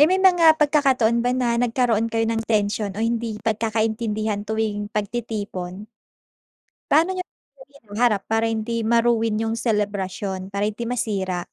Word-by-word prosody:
Eh, 300 - +7
may 370 - +3
mga 355 -4 +5
pagkakataon 270 -6 +3
ba 245 - 0
na 235 -2 +1
nagkaroon 235 -2 +1
kayo 225 -1 0
ng 225 0 0
tension 210 -1 +1
o - - -3
hindi 230 -1 -1
pagkakaintindihan 220 -1 -1
tuwing 215 -2 -2
pagtitipon? 205 -3 -4 1.0
Paano 325 +5 +4
niyo 370 - -4
ito 275 -6 -21 0.2
hinaharap 210 0 +1
para 225 +1 +1
hindi 225 +1 -2
ma-ruin 230 -1 +2
yung 225 +1 -2
selebrasyon, 200 -3 -2
para 200 +1 -2
hindi 215 +3 -3
masira? 195 -7 -2
225 Hz, 140 wpm, -22 LUFS, 210-235 Hz, 1.0 s, Eh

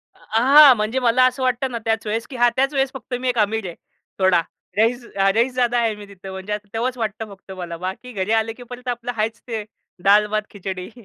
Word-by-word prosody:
अ, - - -25 0.2
हां, 275 +1 +8
म्हणजे 215 +4 -1
मला 250 0 +3
असं 255 +1 0
वाटतं 255 +1 0
ना 235 - -3
त्याच 225 0 0
वेळेस, 220 +1 -2
की 265 - -9
हां 240 0 +5
त्याच 270 +2 +1
वेळेस 270 -1 +1
फक्त 260 -1 -9
मी 255 0 -1
एक 245 - -1
आमि, 220 +1 +1
र - - -11
आहे 170 - -7 0.4
थोडा. 185 -2 +4 0.4
रईस 235 +3 +2
अ, 195 0 +3
रईसजादा 245 +1 +1
आहे 225 -2 +1
मी 210 0 -10
तिथं 195 -1 -10
म्हणजे 190 +2 -5
असं 210 0 -5
तेव्हाच 245 +3 -1
वाटतं 220 -1 -3
फक्त 195 0 -15
मला. 170 -2 -6
बाकी 190 +8 -6
घरी 195 0 -2
आलं, 225 0 +2
की 245 - -10
परत 250 0 -9
आपलं 245 0 -2
आहेच 220 +1 -1
ते 225 -3 -3 0.4
दाल-भात, 210 +1 +4
खिचडी. 190 -2 -6
225 Hz, 230 wpm, -21 LUFS, 205-250 Hz, 0.4 s, हां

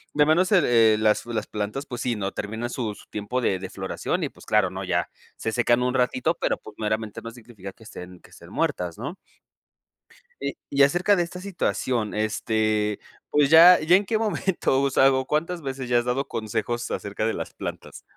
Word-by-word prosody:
de 150 0 +5
menos 175 +4 +3
las 110 - +4
las 110 -3 -3
plantas, 105 +7 -4
pues, 120 -4 -6
sí, 120 -2 0
¿no?, 100 -2 -3
terminan 110 +4 -4
su, 110 -5 -3
su - - -16
tiempo 105 +4 -3
de 95 -5 0
de 95 0 -6
floración, 95 0 -3
y - - -1
pues - - -17
claro, - - +2
¿no?, - - -5
ya - - -1 0.3
se 110 - -3
secan 120 +1 +2
un 125 0 0
ratito, 125 -2 +1
pero, - - 0
pues, - - -13
meramente 110 -1 -2
no 115 - -7
significa 115 -5 -11
que 110 - -18
estén, 90 -4 -10
que - - -19
estén - - -14
muertas, 90 -2 -2
¿no? 140 - -5 1.3
Y - - -4
y 140 0 +4
acerca 175 +8 +3
de 175 - +1
esta 175 +1 -8
situación, 130 - -2
este, 110 -1 0 0.3
pues, 145 -2 +3
ya 170 +3 +9
ya 160 +3 +4
en 200 +2 +2
qué 220 - 0
momento 190 -10 0
usado 135 -1 +3
¿Cuántas 165 +4 -1
veces 135 -2 -5
ya 120 -1 +3
has 120 - -3
dado 130 +3 -1
consejos 120 +2 -3
acerca 100 +1 -3
de 110 - 0
las - - -6
plantas? - - -7
120 Hz, 195 wpm, -24 LUFS, 110-145 Hz, 1.3 s, ya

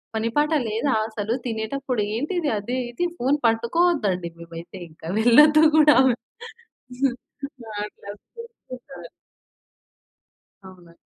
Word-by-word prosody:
పని 225 +1 -1
పాట 300 +2 +2 0.2
లేదా 230 +6 0
అసలు. 220 0 -3
తినేటప్పుడు 240 +1 -3
ఏంటిది 305 +4 -1
అది 245 +5 -4
ఇది" 350 +9 -1
ఫోను 270 +4 +1
పట్టుకోవద్దండి 230 - +1
మేమైతే 170 +3 -10
ఇంకా 160 +1 -13
వెళ్ళొద్దు 300 +7 +6
గూడా 300 -3 +6
మేం. 240 - -1 1.5
ఆ! - - -8
అట్లా 205 - -14
అరుస్తుంటది. 275 - -12 1.6
అవునండి. 175 -3 -15
235 Hz, 105 wpm, -23 LUFS, 205-295 Hz, 1.6 s, వెళ్ళొద్దు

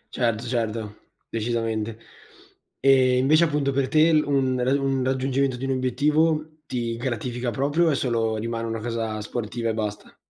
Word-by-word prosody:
Certo, 115 -2 0
certo, 115 -3 -2 0.3
decisamente. 115 -1 -2 0.8
E 130 -2 +4
invece 150 +6 +4
appunto 145 -4 +1
per 135 -1 0
te 155 +3 +5
un 140 -4 +2
rad 130 +3 +2
un 135 -1 0
raggiungimento 130 0 0
di 130 - -4
un 135 - -1
obiettivo 150 +5 +1
ti 120 -2 -3
gratifica 120 0 -3
proprio, 145 +7 +1
o - - +4
è - - +1
solo 115 -4 0
rimane 115 +1 -3
una 115 0 -3
casa 115 -1 -3
sportiva 115 +2 -4
e - - 0
basta? 105 -1 -5
125 Hz, 155 wpm, -24 LUFS, 115-140 Hz, 0.8 s, te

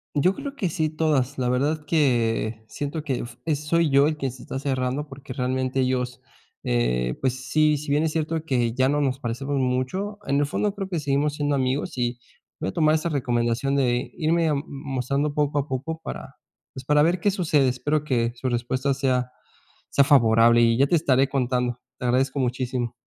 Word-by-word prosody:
Yo 180 +7 +3
creo 280 0 -6
que 190 -9 -1
sí, 155 -1 0
todas. 150 -4 0
La 125 -1 +1
verdad 150 +4 0
que 115 -7 +1
siento 145 +6 -4
que 135 -4 -2
f 120 0 -8
eh, 160 -2 +1
soy 150 +2 +1
yo 140 0 +5
quien 135 -3 -3
se 125 0 -12
está 135 - -5
cerrando, 135 +1 -2
porque 135 -1 -9
realmente 130 +1 -1
ellos, 125 0 -1 0.4
eh, - - 0
pues, 130 0 -2
sí, 155 -1 +3
si 145 +1 -7
bien 145 +2 +2
es 160 - 0
cierto 160 0 -2
que 120 -6 0
ya 130 0 +3
no 145 +1 +1
nos 135 -2 0
parecemos 135 +3 -3
mucho, 130 +11 -1
en 140 +1 +2
el 145 - +2
fondo 200 +7 -1
creo 195 -2 -4
que 175 -4 -2
seguimos 145 +1 0
siendo 145 -1 0
amigos, 130 +1 -1
y 120 0 -1 0.4
voy - - -2
a - - -7
tomar 155 -1 +3
esa 160 +2 0
recomendación 125 -1 0
de 125 -1 0
irme, 165 0 +1
am, 140 -1 0
mostrando 140 +1 -2
poco 145 0 0
a 145 0 0
poco 155 +4 -4
para, - - -7 0.4
pues, 130 - -8
para 150 +1 +4
ver 170 +4 +2
qué 205 +4 +2
sucede. 155 -8 +2
Espero 145 +4 -1
que 120 -5 0
su 130 +1 -3
respuesta 130 +3 0
sea 130 -2 0 0.6
sea 140 - +4
favorable 115 -4 +5
y 115 0 +4
ya 140 +2 +4
te 175 - +3
estaré 135 -4 +3
contando. 125 -2 -1 0.2
Te - - -4
agradezco 130 +3 +1
muchísimo. 125 -1 -1
135 Hz, 200 wpm, -24 LUFS, 125-150 Hz, 0.6 s, yo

